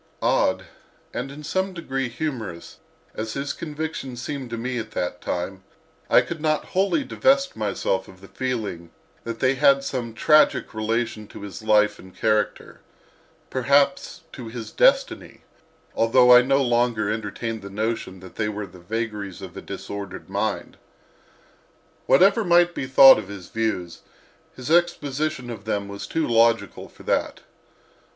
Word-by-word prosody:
Odd, - - +2 0.5
and - - -4
in 145 +2 -10
some 190 +5 -1
degree 135 -7 -3
humorous, 115 - -5 0.3
as 110 0 -4
his 140 +1 -3
convictions 150 -5 -5
seemed 130 0 -5
to 115 - -4
me 125 +1 -3
at 110 -1 -6
that 90 0 -3
time, 95 +2 -4 0.5
I - - +6
could 165 -2 -6
not 155 -1 0
wholly 200 - +2
divest 275 +1 +2
myself 100 -2 -1
of 95 - -15
the 95 - -14
feeling 110 -11 -4 0.4
that 115 0 -4
they 130 0 +3
had 140 0 +4
some 120 -4 -4
tragic 155 +5 +3
relation 110 0 -2
to - - -11
his 100 -1 -8
life 105 -1 +3
and 95 0 -14
character—perhaps 130 +6 -1
to 125 -5 -8
his 115 0 -7
destiny—although 130 - +2
I 125 - +9
no 135 +2 +2
longer 120 -3 +1
entertained 110 +1 -4
the 100 - -8
notion 105 -2 -3
that 95 -2 -13
they 105 -1 0
were 105 0 -4
the 90 -1 -15
vagaries 105 0 -4
of - - -9
a - - -7
disordered 100 -1 -7
mind. - - -2 1.3
Whatever 195 +9 +5
might 175 -1 +4
be 130 - -4
thought 135 0 +9
of - - -8
his 100 -3 -9
views, 110 -6 -3 0.5
his 130 +4 -6
exposition 155 -6 0
of 105 -3 -9
them 100 -2 -2
was 100 0 -7
too 160 -1 -1
logical 115 -4 +2
for - - -17
that. - - -1
115 Hz, 145 wpm, -23 LUFS, 105-140 Hz, 1.3 s, I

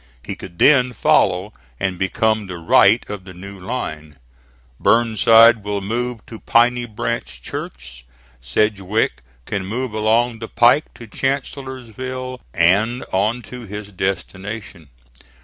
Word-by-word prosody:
He - - -5
could 85 -2 -11
then 125 -1 +5
follow 95 -2 +2 0.3
and 95 -2 -2
become 110 +2 0
the 90 -1 -6
right 100 +6 +4
of 100 -2 -6
the 90 -1 -12
new 100 +2 -10
line. 80 - -5 0.6
Burnside 115 0 +5
will 105 0 -2
move 120 +3 -3
to 110 - -10
Piney 120 +1 +2
Branch 110 - -4
Church. - - -7 0.4
Sedgwick 100 - 0 0.2
can 100 - -3
move 115 +5 -3
along 115 +2 +1
the 115 - -6
pike 120 +8 +3
to 120 - -10
Chancellorsville 130 0 -4
and 100 - +2
on 110 +6 0
to 120 +1 -9
his 105 +1 -7
destination. 95 -2 -5
110 Hz, 125 wpm, -20 LUFS, 95-120 Hz, 0.6 s, then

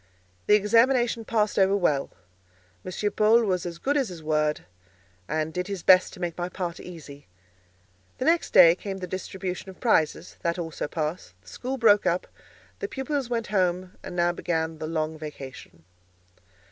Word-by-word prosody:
The 210 - +7
examination 230 +2 +3
passed 215 -3 +1
over 195 +1 +4
well; 150 -7 +1 0.7
M. 205 +3 -2
Paul 220 +2 +4
was 180 -4 -1
as 170 -1 -6
good 280 +11 -1
as 270 -7 +1
his 170 -3 -9
word, 155 -1 0 0.7
and 155 +1 -2
did 180 0 -3
his 195 -4 -5
best 185 0 +6
to - - -11
make 175 -2 -3
my 175 +1 -2
part 180 -2 -4
easy. 145 - -11 0.9
The 255 - -3
next 335 +1 +2
day 170 -3 +8
came 195 +2 -6
the 185 - -5
distribution 185 +1 -5
of 190 - -12
prizes; 165 -11 +1
that 170 +1 -1
also 165 -3 -4
passed; 155 - -4
the 95 - -15
school 260 - -4
broke 210 -4 +4
up; 175 +2 +1 0.5
the 415 - -3
pupils 270 -4 -3
went 230 -2 -1
home, 180 -1 +1
and - - -8
now 175 0 +2
began 160 -2 -2
the 155 - -4
long 155 -1 -2
vacation. 135 - -9
180 Hz, 170 wpm, -26 LUFS, 160-210 Hz, 0.9 s, day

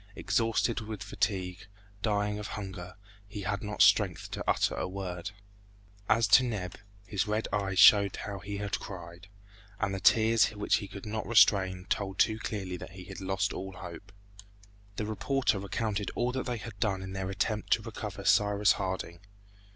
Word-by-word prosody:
Exhausted 115 0 +1
with 105 -3 -6
fatigue, 95 -3 -2 0.3
dying 105 -1 0
of 105 - -5
hunger, 95 -3 -7 0.3
he 100 0 -7
had 95 +2 -2
not 105 0 +2
strength - - +3
to - - -4
utter - - +2
a - - -2
word. 90 -1 -5 0.8
As 115 +1 +4
to 130 - +7
Neb, 100 -7 -3 0.3
his 105 0 -1
red 105 +1 -1
eyes 95 -2 -1
showed 100 0 +7
how 100 -1 -5
he 100 +1 -5
had 100 0 -2
cried, 85 -1 -9 0.5
and 100 -2 0
the 95 - -2
tears 110 +1 +5
which 105 - +2
he 100 - -6
could 100 +1 -9
not 110 0 -4
restrain 95 -5 +4
told 95 -2 -2
too 110 -1 +3
clearly 95 -5 -4
that 85 - -10
he 95 -1 -9
had 90 - -9
lost 95 +1 -1
all 95 0 -6
hope. 90 +1 -10 0.8
The 105 - -2
reporter 110 +1 0
recounted 100 +1 -2
all 120 +1 0
that 130 +1 -3
they 120 -1 -2
had 105 -1 -9
done 95 -3 0
in 95 0 -7
their 95 -1 -3
attempt 105 +2 -2
to 110 - 0
recover 105 -3 -6
Cyrus 105 +1 +4
Harding. 95 -3 -3
100 Hz, 175 wpm, -30 LUFS, 95-110 Hz, 0.8 s, to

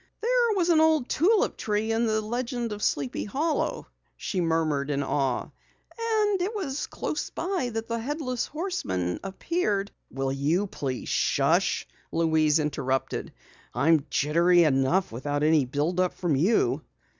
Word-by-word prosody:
"There 475 -1 +2
was 355 -3 +1
an 320 -2 +5
old 315 -5 +3
tulip 395 +8 +2
tree 215 +1 -1
in 225 +1 +1
the 215 0 +1
Legend 240 +1 -3
of 210 0 -5
Sleepy 140 -9 -1
Hollow," 295 +9 -1 0.3
she 185 - -2
murmured 160 -4 0
in 140 -1 0
awe. 135 -2 0
"And 430 -4 -3
it 405 +5 -2
was 300 -9 -3
close 305 - -4
by 355 -7 -2
that 225 0 -4
the 230 0 -2
Headless 255 -1 -3
Horseman 95 - -2
appeared 200 - -1
" - - -49
"Will 135 0 -2
you 150 +8 +1
please 135 -9 -4 0.2
hush?" - - +2 0.2
Louise 160 -2 +3
interrupted. 140 -4 -2 0.4
"I'm 155 -2 +3
jittery 170 +4 +4
enough 150 +5 +2
without 145 +5 -2
any 155 -2 +4
build 150 +8 -1
up 185 -1 +1
from 170 -5 0
you!" 185 +12 +2
195 Hz, 145 wpm, -26 LUFS, -, 0.4 s, an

